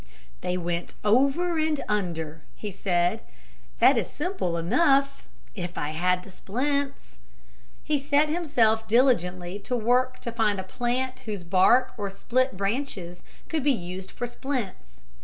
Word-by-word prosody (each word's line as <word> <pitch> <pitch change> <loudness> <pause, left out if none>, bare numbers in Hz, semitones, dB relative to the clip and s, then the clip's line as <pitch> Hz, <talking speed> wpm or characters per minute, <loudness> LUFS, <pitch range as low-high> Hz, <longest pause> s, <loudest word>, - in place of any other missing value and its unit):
"They 180 - -1
went 175 -1 -3
over 280 +10 +3
and 310 -2 +1
under," 165 -6 -2
he 210 - -6
said. 180 +2 0 0.6
"That - - +6
is - - -3
simple 300 - -2
enough 275 - +2 0.3
if 180 -3 -6
I 150 - -1
had 180 +3 +1
the 195 - -13
splints." 265 - -3 0.6
He 300 -2 +1
set 290 +2 +3
himself 240 -10 +2
diligently 195 -6 +2
to 250 - -3
work 250 +2 +2
to 235 - -4
find 215 -4 +1
a - - -3
plant 250 +5 -2
whose 205 -5 -4
bark 190 +9 +4
or 200 -1 -2
split 250 +4 0
branches 195 -4 -3 0.3
could 320 -2 -1
be 285 -1 +4
used 185 -2 -6
for 245 - -4
splints. 235 - -5
220 Hz, 140 wpm, -26 LUFS, 180-270 Hz, 0.6 s, That